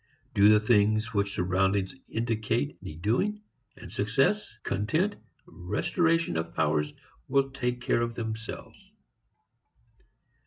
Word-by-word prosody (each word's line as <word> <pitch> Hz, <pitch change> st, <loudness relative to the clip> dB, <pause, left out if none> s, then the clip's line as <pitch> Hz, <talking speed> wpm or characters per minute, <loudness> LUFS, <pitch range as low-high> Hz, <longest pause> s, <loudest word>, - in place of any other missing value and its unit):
Do 105 Hz, -2 st, +6 dB
the 105 Hz, 0 st, +7 dB
things 110 Hz, 0 st, +2 dB
which 100 Hz, -1 st, 0 dB
surroundings 95 Hz, +3 st, +1 dB, 0.2 s
indicate 110 Hz, -10 st, -1 dB
need 80 Hz, +2 st, -9 dB
doing, 205 Hz, -, 0 dB, 0.3 s
and -, -, -11 dB
success, 135 Hz, -, +1 dB
content, 155 Hz, -, 0 dB, 0.3 s
restoration 160 Hz, -, 0 dB
of 80 Hz, +1 st, -4 dB
powers 75 Hz, -1 st, +1 dB, 0.4 s
will 135 Hz, 0 st, +2 dB
take 125 Hz, -2 st, -2 dB
care 120 Hz, -, +1 dB
of 115 Hz, 0 st, -2 dB
themselves. 110 Hz, -1 st, -6 dB
110 Hz, 110 wpm, -28 LUFS, 95-125 Hz, 0.4 s, the